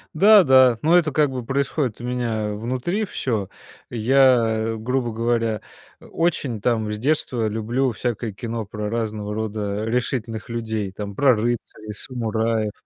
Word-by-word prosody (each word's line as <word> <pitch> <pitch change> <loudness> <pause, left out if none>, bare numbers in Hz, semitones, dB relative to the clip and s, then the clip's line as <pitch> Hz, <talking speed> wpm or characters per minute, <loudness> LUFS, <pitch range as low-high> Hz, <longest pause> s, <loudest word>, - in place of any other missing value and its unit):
Да 200 +3 +7
да, 130 -4 +6
но 165 +3 +4
это 160 -3 +2
как 150 +1 +2
бы 130 -2 -5
происходит 135 -2 -1
у 120 - -6
меня 115 -4 -2
внутри 130 - -2
всё. 115 - -2 0.4
Я, 115 -2 +3
грубо 120 +2 -1
говоря, 115 -1 0 0.4
э, - - -17
очень 145 -10 -1
там 110 -2 0
с 105 - -3
детства 125 -3 0
люблю 120 +5 0
всякое 115 0 -3
кино 115 +2 -5
про 105 +1 -5
разного 105 -2 -3
рода 105 -1 -3
решительных 115 -1 -2
людей, 110 -4 -3
там, 100 0 -6
про 135 -4 +5
рыцарей, 110 -1 -3
самураев, 110 -2 -2
115 Hz, 145 wpm, -22 LUFS, 110-130 Hz, 0.4 s, Да